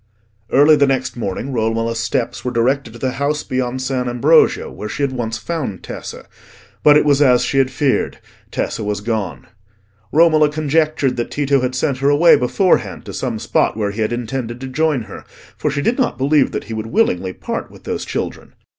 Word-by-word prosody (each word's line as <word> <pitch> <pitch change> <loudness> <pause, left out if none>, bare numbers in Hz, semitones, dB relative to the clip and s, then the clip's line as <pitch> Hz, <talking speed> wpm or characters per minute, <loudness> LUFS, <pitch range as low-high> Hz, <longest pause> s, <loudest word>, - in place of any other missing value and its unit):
Early 145 +3 +6
the 140 -1 +3
next 130 -2 -1
morning 120 +4 -4
Romola's 115 0 -1
steps 120 - -2
were 125 - -1
directed 125 +1 0
to - - -10
the 130 +2 -1
house 150 +1 0
beyond 130 0 -2
San 130 -1 -1
Ambrogio 145 +7 +3
where 105 - -7
she 145 - -3
had 140 - +1
once 115 -3 -3
found 135 - -4
Tessa; - - -8 0.6
but 150 0 +7
it 150 - +2
was 145 -1 +3
as 125 -4 +5
she 135 - +1
had 130 -1 +3
feared: 135 +1 0 0.3
Tessa - - -3
was 105 -1 -2
gone. 105 -4 -3 0.7
Romola 155 -1 +5
conjectured 155 -2 0
that 120 - -2
Tito 140 -2 +1
had 130 0 -2
sent 130 0 -1
her 140 +1 +2
away 155 +4 +6
beforehand 180 +10 +1
to - - -8
some - - -3
spot - - 0
where 105 -2 -1
he 110 +2 -4
had 110 - 0
intended 120 0 -4
to 135 - -5
join 150 -1 0
her, - - -10 0.3
for 150 - -1
she 145 0 -2
did 245 +4 0
not 255 - 0
believe 140 +1 +2
that - - -4
he 115 - -7
would 110 0 -4
willingly 95 - +1
part - - -5
with - - -16
those - - -3
children. - - -5
130 Hz, 200 wpm, -18 LUFS, 115-145 Hz, 0.7 s, but